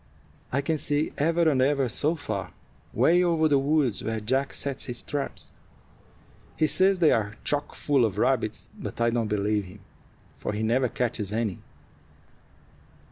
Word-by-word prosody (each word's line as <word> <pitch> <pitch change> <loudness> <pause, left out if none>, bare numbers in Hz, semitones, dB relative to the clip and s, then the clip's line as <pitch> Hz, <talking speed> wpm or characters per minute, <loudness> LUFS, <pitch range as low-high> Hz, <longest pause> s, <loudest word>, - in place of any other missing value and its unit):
I 140 - +1
can 155 +2 -1
see 145 +2 -1
ever 165 +3 +2
and 135 -4 +3
ever 135 0 +2
so 150 +7 0
far 110 - -5 0.4
'way 175 +2 +4
over 165 -2 +1
to - - +4
the 140 -2 +4
woods 140 -5 +1
where 110 0 -2
Jack 130 +6 0
sets 140 -1 -4
his 120 -2 -5
traps. 145 -2 -5 1.1
He 155 - +3
says 190 +4 +3
they 165 -4 +4
are 110 -3 0
chock 145 0 -2
full 140 -4 +2
of 105 -4 0
rabbits; 110 -2 0
but - - -6
I 115 0 +3
don't 115 -2 0
believe 105 0 0
him, 95 +2 -13 0.6
for - - -3
he 105 +1 -2
never 125 +3 +2
catches 110 -3 -2
any. 110 -3 -1
130 Hz, 165 wpm, -26 LUFS, 110-150 Hz, 1.1 s, way